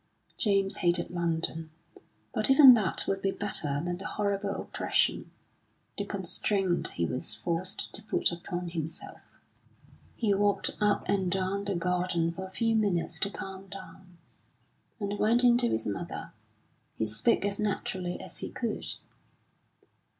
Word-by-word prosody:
James 195 -1 +1
hated 175 0 +1
London, 165 -2 -1 0.6
but 215 -1 +2
even 270 -1 +10
that 210 -7 +2
would 195 0 -1
be 195 - +1
better 155 -9 0
than 175 0 -2
the 195 - -5
horrible 200 -1 -1
oppression, - - 0 0.7
the - - -3
constraint 195 -4 +1
he 85 - 0
was 125 +9 -3
forced 175 +2 -2
to 205 - 0
put 215 - +1
upon 175 +1 -5
himself. 165 -1 -6 0.9
He 215 -4 +1
walked 205 0 +2
up 210 -1 +2
and 190 -3 +1
down 195 +2 -1
the 200 -2 -1
garden 175 -1 0
for 190 +3 -6
a - - -13
few 225 +3 0
minutes 175 -6 0
to 200 - +1
calm 195 -1 -8
down, 190 -2 -12 0.8
and 205 -1 -3
went 235 +3 +3
in 240 -1 +6
to 240 - +4
his 110 - -1
mother. 100 -2 -5 0.6
He 110 - -1
spoke 105 - +1
as 200 0 0
naturally 190 -3 -2
as - - -7
he - - -5
could. 230 -3 -4
190 Hz, 145 wpm, -29 LUFS, 175-205 Hz, 0.9 s, even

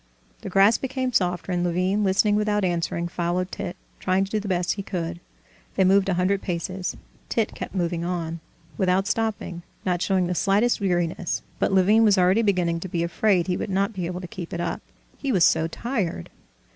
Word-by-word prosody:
The - - -6
grass 195 +4 +5
became 260 -1 -2
softer, 180 -2 0
and 175 -1 0
Levin, 185 +4 +1
listening 205 +2 +3
without 210 -1 +1
answering, 170 -1 -1
followed 175 +1 -2
Tit, 175 - -5 0.2
trying 185 +1 +1
to 195 - -12
do 215 - +1
the 205 - -6
best 180 -2 0
he 200 - -5
could. 170 -3 -4 0.6
They 190 - +3
moved 195 +1 +4
a 185 - +1
hundred 190 +2 +1
paces. 180 +1 -3 0.3
Tit 225 -2 0
kept - - -7
moving 170 -2 -1
on, 170 -2 -3 0.4
without 185 0 +2
stopping, 210 -5 -2 0.2
not 180 -2 0
showing 190 -2 +2
the 180 - -1
slightest 205 +6 +2
weariness, 175 -2 -1 0.2
but - - +1
Levin 195 +4 +5
was 210 -2 +5
already 185 +4 +4
beginning 180 -6 +1
to 185 - -6
be 170 -2 -1
afraid 175 +1 +2
he 180 0 -1
would - - -4
not 195 +2 0
be 180 -4 -3
able 180 +1 -4
to 180 - -6
keep 170 0 -7
it 170 - -3
up: 175 -1 -2 0.4
he 275 - -1
was 185 -7 +5
so 160 - +3
tired. 190 - -3
185 Hz, 195 wpm, -24 LUFS, 175-200 Hz, 0.6 s, grass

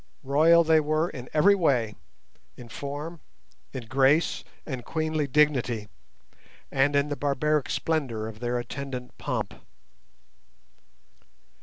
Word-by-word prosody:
Royal 160 +5 +5
they 160 -1 +5
were 155 +2 0
in 125 -2 -8
every 175 +7 +5
way—in 120 - -3
form, 145 +6 -6 0.5
in 130 -3 -6
grace, 135 +6 +2 0.2
and 130 -5 -5
queenly 155 +1 -1
dignity, 125 -7 +2 0.8
and 135 +1 +2
in 140 +1 +2
the 145 - -2
barbaric 145 +1 0
splendour 135 -9 -1
of 110 -1 -8
their 120 +1 -1
attendant 125 +1 -6
pomp. - - -3
140 Hz, 110 wpm, -27 LUFS, 125-155 Hz, 0.8 s, Royal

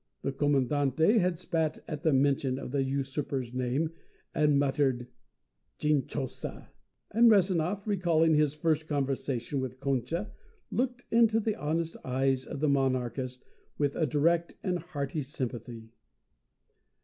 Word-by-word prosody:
The 135 - 0
Commandante 145 - +2
had 180 -2 +1
spat 160 -3 -1
at 150 -3 -5
the 160 -2 +3
mention 135 -1 +2
of 135 - -6
the 140 0 +1
usurper's 135 -2 -2
name 130 +5 0 0.4
and 150 -2 +3
muttered 135 -3 +1 0.7
"Chinchosa!" 145 -3 -2 0.4
and 230 +2 +6
Rezanov, 190 -1 +2
recalling 170 -6 +3
his 150 -1 +3
first 155 0 0
conversation 135 -2 -1
with 130 -1 -4
Concha, 140 - -1 0.4
looked 245 0 -1
into 225 -1 +5
the 215 -1 -1
honest 165 -2 -2
eyes 130 0 0
of 140 - -6
the 155 - +3
monarchist 130 -2 0 0.3
with 145 -1 0
a 160 - +1
direct 170 +3 +1
and 180 -3 0
hearty 145 -2 -4
sympathy. 120 -5 -6
145 Hz, 125 wpm, -29 LUFS, 135-165 Hz, 0.7 s, and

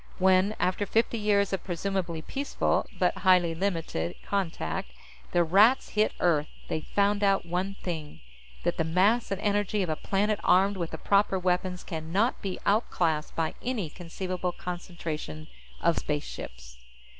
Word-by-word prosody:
When, 190 +2 +4
after 185 +2 0
fifty 225 +2 +1
years 200 -2 +2
of 195 - -2
presumably 175 -2 -2
peaceful 280 - -1
but - - +1
highly 180 -3 +4
limited 165 - -2
contact, 165 - -2 0.4
the 175 - +4
Rats 205 +10 +5
hit 215 0 +2
Earth, 155 -4 +2 0.2
they 155 - -1
found 205 +4 +1
out 195 -2 +3
one 180 +3 -2
thing. 160 -4 -5 0.4
That - - 0
the - - +2
mass 190 +9 +2
and 195 -1 -2
energy 205 -1 +1
of 180 - -3
a 155 - +1
planet 205 +5 0
armed 195 +3 +4
with 170 -2 -2
the - - -6
proper 200 -1 +2
weapons 180 0 -1
can 160 -1 -6
not 220 +7 +1
be 195 -2 -3
out 210 +4 +2
classed 160 -3 0
by 160 -1 0
any 220 -11 -2
conceivable 180 +1 -4
concentration 170 -4 -6 0.3
of 170 -1 +3
spaceships. 60 - -6
185 Hz, 155 wpm, -28 LUFS, 165-200 Hz, 0.4 s, Rats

